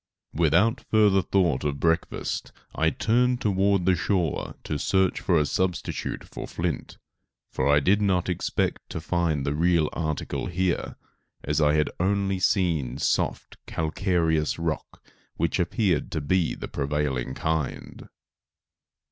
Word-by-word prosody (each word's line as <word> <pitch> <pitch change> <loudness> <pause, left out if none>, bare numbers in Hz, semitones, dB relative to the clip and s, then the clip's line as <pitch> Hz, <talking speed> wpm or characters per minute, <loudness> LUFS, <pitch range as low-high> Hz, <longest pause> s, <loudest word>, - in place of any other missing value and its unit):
Without 85 +8 +3
further 105 -3 +4
thought 90 -3 +1
of 70 -1 -2
breakfast 80 -1 -1 0.2
I 80 +1 +2
turned 120 - +1
toward 100 -4 +2
the 95 - +4
shore 90 -2 -1
to 75 - -3
search 95 +3 +1
for 90 - +2
a 75 - +3
substitute 90 +5 -2
for - - -8
flint, 85 -5 -4 0.5
for 65 - 0
I 75 - +5
did 100 +7 +3
not 95 -3 +1
expect 90 -2 -2
to - - -4
find 85 -6 0
the 70 - 0
real 85 0 +2
article 80 -3 -3
here, 90 0 -1 0.5
as 75 +2 0
I 75 0 +4
had 75 0 +1
only 95 +1 +1
seen 85 - +1
soft, - - -1
calcareous 80 -1 0
rock 80 -1 -4 0.3
which - - 0
appeared 90 -1 +1
to 80 - -1
be 85 +4 +1
the - - -6
prevailing 70 -3 -2
kind. 80 -3 -3
85 Hz, 135 wpm, -26 LUFS, 75-95 Hz, 0.5 s, I